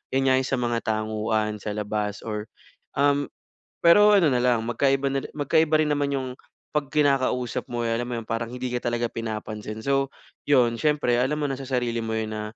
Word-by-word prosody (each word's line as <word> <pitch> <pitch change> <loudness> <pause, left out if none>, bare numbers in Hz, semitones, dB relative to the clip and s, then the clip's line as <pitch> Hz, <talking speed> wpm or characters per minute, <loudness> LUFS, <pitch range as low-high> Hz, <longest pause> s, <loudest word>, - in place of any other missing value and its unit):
'yan 135 - +3
nga, - - +5
'yong 130 - -2
sa 135 - 0
mga 120 -1 0
tanguan 110 0 -1
sa 105 - -4
labas. 105 -1 -3
Or, 105 -1 -3 0.5
um 145 0 +2 0.6
pero 205 +5 +7
ano 175 - +4
na 125 - +2
lang 120 -2 +2
magkaiba 135 +3 +1
na 135 0 -1
ri - - -6
magkaiba 155 +2 +2
rin 150 - 0
naman 145 -1 0
'yong 130 -1 -2 0.5
'pag 150 -2 0
kinakausap 135 -4 +1
mo, 120 0 -2
alam 115 +1 0
mo 120 - -2
'yon, 115 - -8
parang 115 0 -2
hindi 125 0 -4
ka 120 - -2
talaga 120 0 0
pinapansin. 110 -1 -5
So, 135 0 +1 0.4
'yon 125 -4 +4
siyempre 150 -5 +2
alam 140 +4 0
mo 145 - +1
na - - 0
sa - - -7
sarili 120 -3 0
mo 110 0 -3
'yon 110 0 -3
na, 105 - -4
125 Hz, 205 wpm, -25 LUFS, 110-140 Hz, 0.6 s, pero